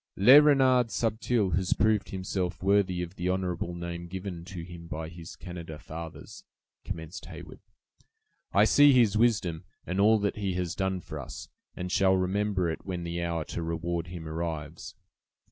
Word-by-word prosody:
"Le 130 Hz, +10 st, +9 dB
Renard 130 Hz, -4 st, +4 dB
Subtil 110 Hz, -2 st, 0 dB
has 95 Hz, 0 st, +1 dB
proved 105 Hz, -2 st, +1 dB
himself 95 Hz, -1 st, -3 dB
worthy 95 Hz, -2 st, +2 dB
of 90 Hz, +2 st, -9 dB
the 90 Hz, +1 st, -1 dB
honorable 90 Hz, -2 st, -2 dB
name 85 Hz, 0 st, -5 dB
given 90 Hz, -1 st, -6 dB
to 90 Hz, -1 st, -7 dB
him 85 Hz, -1 st, -10 dB
by 80 Hz, 0 st, -5 dB
his 85 Hz, 0 st, -10 dB
Canada 85 Hz, -3 st, -8 dB
fathers," 80 Hz, +1 st, -9 dB, 0.4 s
commenced 80 Hz, +4 st, -7 dB
Heyward; -, -, -10 dB, 0.9 s
"I -, -, +5 dB
see 145 Hz, -1 st, +6 dB
his 115 Hz, -5 st, +4 dB
wisdom, 105 Hz, -8 st, +2 dB, 0.2 s
and 90 Hz, +3 st, -2 dB
all 110 Hz, +2 st, +6 dB
that 100 Hz, 0 st, -1 dB
he 100 Hz, -3 st, -1 dB
has 90 Hz, -1 st, -2 dB
done 95 Hz, -1 st, -1 dB
for 75 Hz, -2 st, -7 dB
us, 65 Hz, -, -8 dB, 0.3 s
and 90 Hz, 0 st, -5 dB
shall 95 Hz, -1 st, +4 dB
remember 95 Hz, 0 st, 0 dB
it 80 Hz, -, -4 dB
when 90 Hz, -3 st, -4 dB
the 85 Hz, 0 st, -3 dB
hour 85 Hz, -2 st, -2 dB
to -, -, -5 dB
reward 85 Hz, +1 st, -2 dB
him 85 Hz, -2 st, -7 dB
arrives. 80 Hz, -1 st, -5 dB
90 Hz, 165 wpm, -28 LUFS, 85-100 Hz, 0.9 s, Le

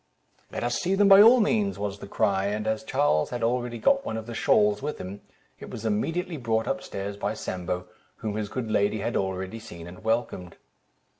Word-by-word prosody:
"Let -, -, -4 dB
us 120 Hz, 0 st, 0 dB
see 185 Hz, +2 st, +1 dB
them, 205 Hz, +1 st, +4 dB
by 195 Hz, 0 st, +9 dB
all 235 Hz, +4 st, +8 dB
means," 210 Hz, -1 st, +1 dB
was 100 Hz, -1 st, -4 dB
the 100 Hz, -, -8 dB
cry; 100 Hz, -2 st, +1 dB
and 105 Hz, +1 st, -2 dB
as 110 Hz, 0 st, -1 dB
Charles 75 Hz, +1 st, +1 dB
had 120 Hz, -2 st, -4 dB
really 120 Hz, 0 st, 0 dB
got 275 Hz, -, +3 dB
one 110 Hz, -, -3 dB
of 110 Hz, -, -5 dB
the 120 Hz, -, -7 dB
shawls 105 Hz, -2 st, +3 dB
with 150 Hz, +2 st, -3 dB
him, 95 Hz, +2 st, -7 dB, 0.4 s
it -, -, -9 dB
was 110 Hz, -, -7 dB
immediately 165 Hz, -, -1 dB
brought 115 Hz, -3 st, 0 dB
up -, -, -1 dB
stairs 100 Hz, +1 st, -5 dB
by 105 Hz, +1 st, -2 dB
Sambo, 90 Hz, -2 st, -4 dB, 0.3 s
whom 105 Hz, -2 st, -4 dB
his 105 Hz, -1 st, -3 dB
good 115 Hz, -1 st, -4 dB
lady 105 Hz, 0 st, +1 dB
had 115 Hz, -, -2 dB
already 95 Hz, +2 st, -2 dB
seen 85 Hz, -7 st, -10 dB
and 90 Hz, +3 st, -11 dB
welcomed. 110 Hz, -6 st, -2 dB
110 Hz, 210 wpm, -26 LUFS, 100-120 Hz, 0.4 s, by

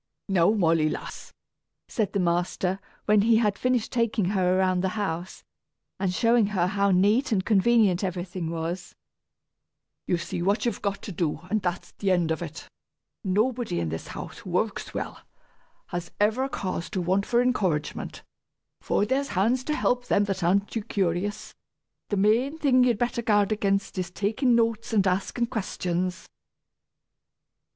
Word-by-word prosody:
"Now, 185 Hz, -3 st, +3 dB
Molly, 165 Hz, -7 st, +3 dB
lass," -, -, -7 dB, 0.6 s
said 215 Hz, -6 st, -1 dB
the 200 Hz, -, +1 dB
master, 180 Hz, +2 st, 0 dB, 0.3 s
when 210 Hz, -1 st, +4 dB
he 225 Hz, +2 st, +4 dB
had 210 Hz, -3 st, +2 dB
finished 250 Hz, -3 st, 0 dB
taking 230 Hz, -4 st, +1 dB
her 185 Hz, -1 st, +2 dB
around 185 Hz, -1 st, +2 dB
the 190 Hz, +2 st, -2 dB
house, 185 Hz, -3 st, -3 dB, 0.6 s
and 190 Hz, -2 st, 0 dB
showing 230 Hz, +3 st, +3 dB
her 190 Hz, -4 st, +1 dB
how 200 Hz, +2 st, +1 dB
neat 205 Hz, +9 st, +3 dB
and 195 Hz, -3 st, +1 dB
convenient 210 Hz, -3 st, +3 dB
everything 180 Hz, -2 st, -3 dB
was; 165 Hz, +2 st, -4 dB, 1.1 s
"you 175 Hz, -, +2 dB
see 170 Hz, -, -4 dB
what 205 Hz, +5 st, +1 dB
you've 235 Hz, -4 st, -1 dB
got 200 Hz, -1 st, -2 dB
to -, -, -6 dB
do, 160 Hz, -3 st, -2 dB
and 215 Hz, -1 st, +1 dB
that's 175 Hz, -1 st, -3 dB
the 200 Hz, -, -2 dB
end 175 Hz, -3 st, +2 dB
of 160 Hz, -, -1 dB
it. 165 Hz, -2 st, -7 dB, 0.6 s
Nobody 220 Hz, -, 0 dB
in 85 Hz, -2 st, -1 dB
this 80 Hz, +1 st, -5 dB
house, -, -, -8 dB
who -, -, -10 dB
works -, -, -1 dB
well, -, -, -5 dB, 0.7 s
has 175 Hz, -1 st, -4 dB
ever 220 Hz, +6 st, +2 dB
cause 185 Hz, -8 st, -3 dB
to 200 Hz, -, -2 dB
want 190 Hz, +3 st, +1 dB
for 240 Hz, -, +3 dB
encouragement, 195 Hz, -12 st, -1 dB, 0.6 s
for 205 Hz, -, +1 dB
there's 270 Hz, +5 st, 0 dB
hands 235 Hz, +7 st, +1 dB
to 305 Hz, -, 0 dB
help 245 Hz, -4 st, 0 dB
them 205 Hz, -, +3 dB
that 195 Hz, -3 st, -2 dB
aren't 200 Hz, +4 st, +2 dB
too 225 Hz, -, -2 dB
curious! 195 Hz, 0 st, -2 dB, 0.6 s
The 205 Hz, -, 0 dB
main 230 Hz, +9 st, +2 dB
thing 260 Hz, -5 st, +4 dB
you'd 240 Hz, -3 st, +3 dB
better 240 Hz, +1 st, -1 dB
guard 205 Hz, -2 st, +2 dB
against 195 Hz, -2 st, 0 dB
is 180 Hz, -1 st, -2 dB
takin' 220 Hz, +7 st, +1 dB
notes 230 Hz, -1 st, 0 dB
and 200 Hz, -3 st, +3 dB
askin' 195 Hz, +6 st, 0 dB
questions." 185 Hz, -6 st, -3 dB
200 Hz, 160 wpm, -26 LUFS, 180-225 Hz, 1.1 s, when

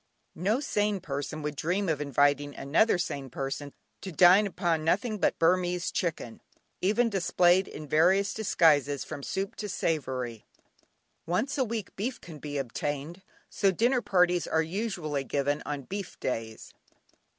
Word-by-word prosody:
No 210 Hz, +7 st, +2 dB
sane 210 Hz, -7 st, 0 dB
person 145 Hz, 0 st, -5 dB
would 150 Hz, 0 st, -3 dB
dream 185 Hz, +7 st, -1 dB
of 155 Hz, -3 st, 0 dB
inviting 145 Hz, 0 st, +1 dB
another 165 Hz, +10 st, +2 dB
sane 140 Hz, -6 st, -3 dB
person 135 Hz, +2 st, -4 dB, 0.3 s
to 190 Hz, -, -6 dB
dine 185 Hz, +5 st, +6 dB
upon 170 Hz, -4 st, -1 dB
nothing 210 Hz, +6 st, 0 dB
but -, -, +1 dB
Burmese 180 Hz, +1 st, +1 dB
chicken, 160 Hz, -9 st, -3 dB, 0.4 s
even 215 Hz, +6 st, +3 dB
displayed 185 Hz, -2 st, +3 dB
in 150 Hz, 0 st, -9 dB
various 185 Hz, +7 st, +3 dB
disguises 150 Hz, -9 st, +2 dB
from 155 Hz, -2 st, -7 dB
soup 195 Hz, +9 st, -3 dB
to 210 Hz, -, -4 dB
savoury. 130 Hz, -, -2 dB, 0.8 s
Once 180 Hz, +11 st, 0 dB
a 270 Hz, -, +2 dB
week 225 Hz, -4 st, -5 dB
beef 235 Hz, +6 st, -3 dB
can 160 Hz, -4 st, -11 dB
be 145 Hz, 0 st, -5 dB
obtained, 145 Hz, +6 st, -4 dB, 0.3 s
so 195 Hz, -2 st, +1 dB
dinner 240 Hz, +6 st, +2 dB
parties 180 Hz, -4 st, +2 dB
are 160 Hz, -, +2 dB
usually 165 Hz, -6 st, -3 dB
given 145 Hz, +1 st, -1 dB
on 145 Hz, -2 st, -3 dB
"beef 195 Hz, +6 st, -6 dB
days." 115 Hz, -3 st, -4 dB
170 Hz, 145 wpm, -28 LUFS, 145-195 Hz, 0.8 s, dine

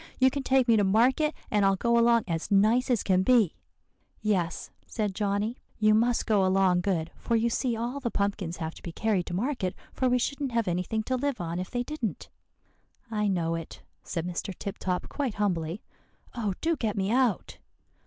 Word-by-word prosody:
You 260 Hz, 0 st, +4 dB
can 280 Hz, +1 st, -2 dB
take 260 Hz, -1 st, +2 dB
me 230 Hz, -1 st, +5 dB
to 205 Hz, -, +3 dB
market, 255 Hz, +10 st, +3 dB, 0.2 s
and 210 Hz, -2 st, +3 dB
I'll 195 Hz, 0 st, +4 dB
go 235 Hz, +4 st, +1 dB
along 235 Hz, -1 st, +4 dB
as 165 Hz, -2 st, -3 dB
nice 220 Hz, +6 st, +3 dB
as 240 Hz, -5 st, +2 dB
can 185 Hz, -1 st, +3 dB
be.' 225 Hz, -4 st, +4 dB, 0.7 s
"'Yes,' 190 Hz, -6 st, -1 dB, 0.2 s
said 210 Hz, -4 st, -2 dB
Johnny; 205 Hz, +4 st, -1 dB, 0.2 s
'you 215 Hz, 0 st, +4 dB
must 235 Hz, +2 st, +2 dB
go 210 Hz, -4 st, +3 dB
along 185 Hz, -1 st, +3 dB
good; 175 Hz, -4 st, -1 dB
for 235 Hz, -, 0 dB
you 230 Hz, +1 st, +2 dB
see 245 Hz, 0 st, 0 dB
all 240 Hz, +5 st, -3 dB
the 250 Hz, -3 st, -2 dB
pumpkins 200 Hz, -5 st, -2 dB
have 160 Hz, -1 st, -4 dB
to -, -, -14 dB
be 170 Hz, -, -6 dB
carried 200 Hz, -1 st, 0 dB
to 175 Hz, -, -3 dB
market, 215 Hz, -3 st, -1 dB, 0.2 s
for 255 Hz, -, +1 dB
we 250 Hz, -, +3 dB
shouldn't 275 Hz, +1 st, -2 dB
have 230 Hz, -3 st, +1 dB
anything 180 Hz, +5 st, -1 dB
to 255 Hz, -, -1 dB
live 280 Hz, 0 st, -1 dB
on 170 Hz, 0 st, -3 dB
if 185 Hz, -, -4 dB
they 245 Hz, 0 st, -2 dB
didn't.' 250 Hz, -6 st, -4 dB, 0.8 s
"'I 210 Hz, -1 st, 0 dB
know 170 Hz, -4 st, 0 dB
it,' 165 Hz, -1 st, -6 dB, 0.2 s
said 165 Hz, -2 st, -4 dB
Mr. 180 Hz, +1 st, -4 dB
Tip 200 Hz, -, -6 dB
Top 180 Hz, -1 st, -2 dB
quite 270 Hz, -7 st, -3 dB
humbly; 180 Hz, -3 st, -1 dB, 0.5 s
'oh, 215 Hz, -6 st, -2 dB
do 330 Hz, +1 st, +1 dB
get 220 Hz, -7 st, -2 dB
me 195 Hz, +1 st, 0 dB
out! 245 Hz, -5 st, +1 dB
215 Hz, 200 wpm, -28 LUFS, 185-245 Hz, 0.8 s, me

